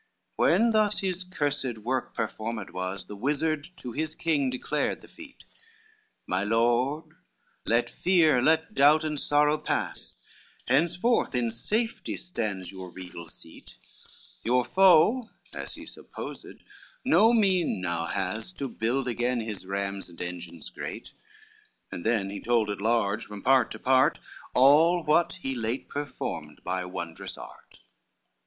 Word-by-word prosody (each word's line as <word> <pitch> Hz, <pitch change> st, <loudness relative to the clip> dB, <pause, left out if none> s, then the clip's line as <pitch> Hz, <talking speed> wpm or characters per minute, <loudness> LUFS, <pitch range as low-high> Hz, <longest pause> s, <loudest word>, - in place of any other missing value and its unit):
XII -, -, -47 dB
When 230 Hz, +1 st, +4 dB
thus 215 Hz, -1 st, +2 dB
his 185 Hz, -1 st, -1 dB
cursed 145 Hz, -8 st, -1 dB
work 125 Hz, +4 st, -3 dB
performed 110 Hz, -2 st, -4 dB
was, 95 Hz, +1 st, -4 dB
The 105 Hz, -, -9 dB
wizard 145 Hz, +6 st, -1 dB
to 125 Hz, -, -6 dB
his 155 Hz, +5 st, -3 dB
king 150 Hz, -5 st, +1 dB
declared 140 Hz, +3 st, -2 dB
the -, -, -15 dB
feat, 315 Hz, -4 st, -14 dB, 0.8 s
"My 90 Hz, +2 st, -1 dB
lord, 120 Hz, +7 st, +1 dB, 0.5 s
let 120 Hz, +1 st, +3 dB
fear, 160 Hz, -5 st, +3 dB
let 160 Hz, +3 st, +2 dB
doubt 150 Hz, +3 st, +5 dB
and 150 Hz, -2 st, -2 dB
sorrow 150 Hz, +1 st, +3 dB
pass, -, -, -1 dB, 0.5 s
Henceforth 170 Hz, -, +2 dB
in 120 Hz, -2 st, +1 dB
safety 215 Hz, -, 0 dB
stands 105 Hz, -, -4 dB
your 95 Hz, -1 st, -8 dB
regal 90 Hz, -2 st, -9 dB
seat, 80 Hz, -, -11 dB, 0.7 s
Your 125 Hz, +1 st, +2 dB
foe, 195 Hz, -, +5 dB, 0.2 s
as -, -, -6 dB
he -, -, -10 dB
supposed, -, -, -9 dB, 0.4 s
no 225 Hz, +2 st, +6 dB
mean 190 Hz, -, +2 dB
now 85 Hz, -2 st, -2 dB
has 100 Hz, -, -2 dB
To 140 Hz, -6 st, -4 dB
build 125 Hz, +2 st, -1 dB
again 120 Hz, +1 st, 0 dB
his 105 Hz, -4 st, -6 dB
rams 100 Hz, -1 st, -3 dB
and 85 Hz, -, -15 dB
engines 85 Hz, -2 st, -5 dB
great:" -, -, -7 dB, 0.8 s
And 85 Hz, -, -6 dB
then 110 Hz, -4 st, +1 dB
he 100 Hz, -, -6 dB
told 115 Hz, -3 st, +1 dB
at 100 Hz, -, -5 dB
large 110 Hz, -1 st, +1 dB
from 105 Hz, -1 st, -9 dB
part 135 Hz, -1 st, +4 dB
to -, -, -6 dB
part, 130 Hz, 0 st, +3 dB, 0.4 s
All 160 Hz, +7 st, +6 dB
what 155 Hz, +3 st, +3 dB
he 135 Hz, -, -1 dB
late 120 Hz, +1 st, -3 dB
performed 80 Hz, -, -5 dB
by 90 Hz, 0 st, -2 dB
wondrous 85 Hz, -2 st, -6 dB
art. -, -, -13 dB
125 Hz, 140 wpm, -27 LUFS, 100-155 Hz, 0.8 s, no